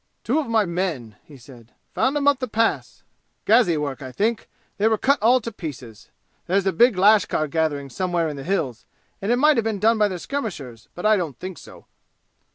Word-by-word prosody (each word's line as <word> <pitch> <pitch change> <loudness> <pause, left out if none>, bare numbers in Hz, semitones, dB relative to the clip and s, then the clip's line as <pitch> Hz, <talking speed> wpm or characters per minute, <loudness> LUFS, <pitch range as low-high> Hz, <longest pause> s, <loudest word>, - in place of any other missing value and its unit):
"Two 260 +8 +1
of 305 - -3
my 225 -2 +2
men!" 170 - -3
he 145 - -15
said. 120 -2 -16 0.2
"Found 270 +3 +1
'em 285 -1 -1
up 285 -2 +4
the 255 - -3
Pass. 225 0 -1 0.4
Gazi 215 -7 +4
work 145 -2 -4
I 130 -1 -7
think. 220 - -2 0.3
They 210 - +3
were 220 -1 +2
cut 275 +4 +1
all 245 +4 +4
to 230 - -6
pieces. 130 - -9 0.4
There's 195 +2 +1
a 195 - +1
big 235 +3 +4
lashkar 200 -5 +3
gathering 145 -3 -2
somewhere 175 +2 -1
in 150 - -5
the 135 - -8
'Hills,' 155 - -2 0.4
and 200 +4 -1
it - - +4
might 300 +2 +4
have 230 - +2
been 220 -2 -2
done 220 +3 +2
by 210 - +4
their 185 -3 -5
skirmishers, 170 - -6
but 175 - -6
I 215 0 +5
don't 165 -8 -4
think 185 -1 -8
so." - - -15
190 Hz, 210 wpm, -22 LUFS, 150-225 Hz, 0.4 s, I